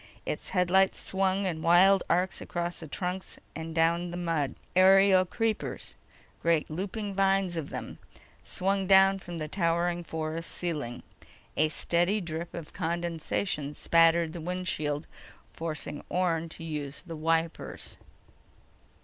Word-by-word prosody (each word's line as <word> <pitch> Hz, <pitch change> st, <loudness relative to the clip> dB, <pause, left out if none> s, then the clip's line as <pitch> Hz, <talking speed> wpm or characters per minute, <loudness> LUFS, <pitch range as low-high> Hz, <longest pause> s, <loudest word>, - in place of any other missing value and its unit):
Its -, -, -4 dB
headlights 190 Hz, +1 st, +3 dB
swung 190 Hz, +1 st, 0 dB
in 165 Hz, -4 st, -2 dB
wild 185 Hz, +3 st, +6 dB
arcs 180 Hz, +2 st, +1 dB
across 175 Hz, 0 st, -3 dB
the 160 Hz, -, -7 dB
trunks 180 Hz, +4 st, -4 dB, 0.2 s
and 160 Hz, +1 st, -6 dB
down 170 Hz, +1 st, +3 dB
to -, -, -4 dB
the 175 Hz, -, -5 dB
mud. 165 Hz, -6 st, -1 dB, 0.2 s
Aerial 190 Hz, 0 st, +6 dB
creepers—great 175 Hz, -6 st, -2 dB
looping 200 Hz, +4 st, -3 dB
vines 195 Hz, -2 st, +2 dB
of 160 Hz, -3 st, -4 dB
them—swung 195 Hz, 0 st, -4 dB
down 195 Hz, 0 st, +6 dB
from 175 Hz, -2 st, -7 dB
the 155 Hz, -1 st, -3 dB
towering 170 Hz, 0 st, 0 dB
forest 160 Hz, 0 st, -4 dB
ceiling. 150 Hz, -9 st, -4 dB, 0.5 s
A 155 Hz, +1 st, +3 dB
steady 175 Hz, +6 st, +1 dB
drip 170 Hz, -1 st, -5 dB
of 170 Hz, -3 st, -8 dB
condensation 165 Hz, -3 st, -2 dB
spattered 165 Hz, -1 st, +4 dB
the 170 Hz, -, -6 dB
windshield, 160 Hz, -4 st, -2 dB, 0.5 s
forcing 155 Hz, -2 st, -5 dB
Orne 170 Hz, -2 st, 0 dB
to 165 Hz, -, -9 dB
use 150 Hz, -3 st, -5 dB
the 170 Hz, -2 st, -7 dB
wipers. 165 Hz, +1 st, -1 dB
170 Hz, 125 wpm, -29 LUFS, 160-185 Hz, 0.5 s, wild